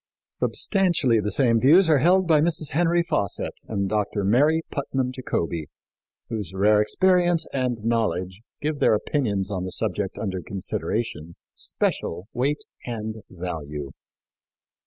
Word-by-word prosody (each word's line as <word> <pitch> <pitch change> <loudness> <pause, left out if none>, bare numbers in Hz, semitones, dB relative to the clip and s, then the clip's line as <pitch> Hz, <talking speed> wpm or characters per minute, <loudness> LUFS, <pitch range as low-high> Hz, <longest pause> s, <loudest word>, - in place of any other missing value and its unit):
" - - -69
Substantially 175 - +1
the 105 0 -1
same 115 +1 +3
views 160 - +6
are 155 -3 +5
held 185 +5 +4
by 155 -3 +4
Mrs. 160 -2 -1
Henry 170 +3 +2
Fawcett 150 - -2
and 100 -3 -1
Dr. 105 0 -1
Mary 145 +11 +3
Putnam 135 -3 -1
Jacobi, 85 - -3 0.6
whose 105 -5 -5
rare 105 +2 +4
experience 175 - +2
and 125 -4 -1
knowledge 95 -5 -1 0.2
give 150 -1 -2
their - - +4
opinions 105 -5 -1
on 95 -2 -2
the 95 - -4
subject 100 -2 -2
under 95 -4 -3
consideration 95 -2 -4 0.2
special 90 +4 -2
weight 140 +4 0 0.2
and 110 -2 -4
value. 75 -6 -5
115 Hz, 135 wpm, -24 LUFS, 95-150 Hz, 0.6 s, views